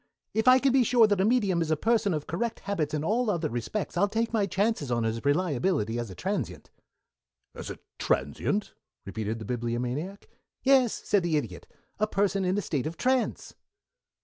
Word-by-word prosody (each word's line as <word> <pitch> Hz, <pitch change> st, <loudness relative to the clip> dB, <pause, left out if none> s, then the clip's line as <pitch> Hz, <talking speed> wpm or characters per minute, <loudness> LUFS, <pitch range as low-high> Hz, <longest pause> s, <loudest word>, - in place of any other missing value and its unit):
If 220 Hz, +2 st, 0 dB
I 255 Hz, 0 st, +9 dB
can 270 Hz, 0 st, +2 dB
be 265 Hz, -1 st, +5 dB
sure 235 Hz, 0 st, +5 dB
that 205 Hz, -3 st, +2 dB
a -, -, +3 dB
medium 205 Hz, -7 st, +2 dB
is 160 Hz, -, -1 dB
a 155 Hz, -, +2 dB
person 225 Hz, +2 st, +2 dB
of 150 Hz, -, -4 dB
correct 220 Hz, +9 st, -3 dB
habits 165 Hz, -7 st, -2 dB
in 150 Hz, -, -2 dB
all 225 Hz, +7 st, +1 dB
other 170 Hz, -6 st, 0 dB
respects, 120 Hz, -, -3 dB
I'll 195 Hz, +3 st, +3 dB
take 225 Hz, +2 st, -1 dB
my 210 Hz, -3 st, +2 dB
chances 195 Hz, -, 0 dB
on 120 Hz, -1 st, 0 dB
his 115 Hz, 0 st, -2 dB
reliability 145 Hz, -, +1 dB
as 120 Hz, -3 st, -4 dB
a 95 Hz, -, -9 dB
transient." -, -, -4 dB, 0.8 s
"As -, -, -7 dB
a -, -, -6 dB, 0.2 s
transient?" 135 Hz, -, -1 dB, 0.3 s
repeated 110 Hz, +2 st, -3 dB
the 110 Hz, -, -7 dB
Bibliomaniac. 125 Hz, -, -3 dB, 0.4 s
"Yes," 260 Hz, -4 st, +5 dB
said 205 Hz, -, +3 dB
the 170 Hz, -3 st, +1 dB
Idiot. 145 Hz, -, -5 dB, 0.3 s
"A 215 Hz, -, +2 dB
person 200 Hz, -1 st, +1 dB
in 185 Hz, +2 st, +1 dB
a -, -, +1 dB
state 150 Hz, -6 st, -2 dB
of 165 Hz, +1 st, -6 dB
trance." 255 Hz, -1 st, 0 dB
185 Hz, 190 wpm, -28 LUFS, 140-220 Hz, 0.8 s, I